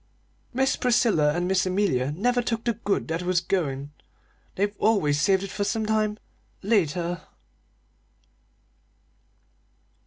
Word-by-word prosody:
Miss 265 +1 +1
Priscilla 230 - +3
and 175 +1 -1
Miss 190 0 +1
Amelia 180 -9 +1
never 245 +10 +1
took 230 -1 -2
the 235 - +1
good 205 -2 -2
that 165 +1 -1
was 180 0 +1
goin'; 145 -6 -2 0.6
they've 205 +1 0
always 150 -10 +2
saved 190 +3 +3
it 195 - -6
for 205 - -2
sometime 215 0 0 0.5
later." 175 -4 0
195 Hz, 115 wpm, -25 LUFS, 170-220 Hz, 0.6 s, Priscilla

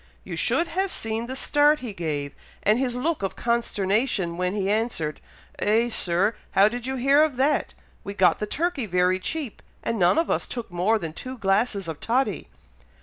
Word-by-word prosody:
You - - -6
should 335 - +1
have 385 +2 -1
seen 225 -5 -3
the 260 - -5
start 295 +3 +3
he 240 -5 -5
gave, 150 -5 -3 0.3
and 215 +3 +3
his 250 -2 -1
look 300 +3 -1
of 195 - -2
consternation, 210 -5 0
when 180 +2 -1
he 195 -2 -1
answered, 205 -8 -1 0.4
'Eh, 225 +3 +2
Sir! 190 0 +2 0.2
how 195 +2 +6
did 240 +2 -4
ye 265 0 -2
hear 275 +4 +4
of 310 -4 +2
that! 275 +4 +1 0.3
We 200 - -6
got 190 -2 +4
the 210 - -2
turkey 315 -3 -1
very 180 0 +2
cheap, 285 +3 -4 0.2
and 230 - -2
none 180 - +4
of 330 - +1
us - - -1
took 235 -6 -6
more 185 +6 +2
than 165 -6 -5
two 255 +8 -7
glasses 200 -2 0
of 160 -2 -5
toddy.'" 230 - 0
220 Hz, 190 wpm, -25 LUFS, 190-260 Hz, 0.4 s, how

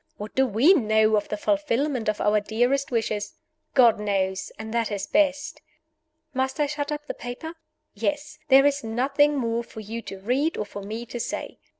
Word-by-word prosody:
What 210 +1 -7
do 265 0 +3
we 250 - +5
know 220 - +3
of 205 - -1
the 210 - -2
fulfillment 285 -2 0
of 215 - -2
our 210 0 +3
dearest 245 +6 0
wishes? 220 -3 -2 0.4
God 240 -5 +6
knows 195 -2 -1
and 220 0 -7
that 230 -2 0
is 200 -1 -2
best. 290 -2 +1 0.7
Must 265 +2 -1
I 295 - +3
shut 290 0 -3
up 295 0 -4
the - - -4
paper? 245 +7 -7 0.4
Yes. 295 +7 -3
There 270 0 +7
is 280 -2 +2
nothing 275 +6 +2
more 235 -2 -1
for 225 - -11
you 220 +2 -6
to 195 - -8
read 260 +11 0
or 210 - -2
for 205 0 -8
me 220 +4 -6
to 240 0 -6
say. - - -5
240 Hz, 190 wpm, -25 LUFS, 215-285 Hz, 0.7 s, There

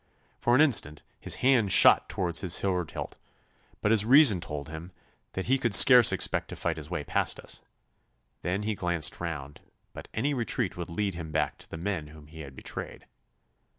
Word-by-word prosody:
For 120 - +1
an 140 - +4
instant 105 - +1 0.2
his - - -5
hand 120 -7 +3
shot - - +6
towards 85 -3 -2
his 90 -3 -1
sword 90 -4 -2
hilt, - - -8 0.6
but 105 - 0
his 110 -2 +5
reason 120 - +5
told 75 -3 -7
him 80 +3 -9 0.4
that 95 - -5
he 135 +2 +1
could 115 -5 +5
scarce 125 +1 +8
expect - - 0
to - - -9
fight 80 -2 -3
his 75 -1 -9
way 85 -4 -4
past - - -2
us. - - -7 0.8
Then 95 +5 -3
he 110 +1 -2
glanced 85 -5 -2
round, 75 -4 -7 0.3
but - - -11
any 140 +7 -2
retreat 120 -4 -2
would 90 0 -7
lead 100 +3 -3
him 85 -2 -8
back 75 -1 -2
to - - -15
the - - -8
men 85 -3 -4
whom 75 0 -15
he 80 +1 -15
had 70 -4 -10
betrayed. - - -8
90 Hz, 190 wpm, -27 LUFS, 80-110 Hz, 0.8 s, scarce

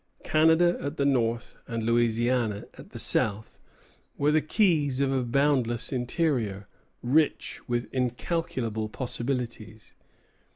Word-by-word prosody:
Canada 160 +3 +4
at 145 +3 -4
the 140 - +1
north, 120 -4 0
and 115 -3 -3
Louisiana 115 -1 +1
at - - -13
the - - -9
south, 105 +1 0 0.6
were 145 +1 +2
the 155 0 +3
keys 155 - +2
of 140 -1 +1
a 135 -1 +1
boundless 120 -2 +1
interior, 120 - -1 0.4
rich 145 +5 +1
with 120 -1 -1
incalculable 125 -4 -2
possibilities. 120 -3 -5
125 Hz, 115 wpm, -27 LUFS, 115-145 Hz, 0.6 s, Canada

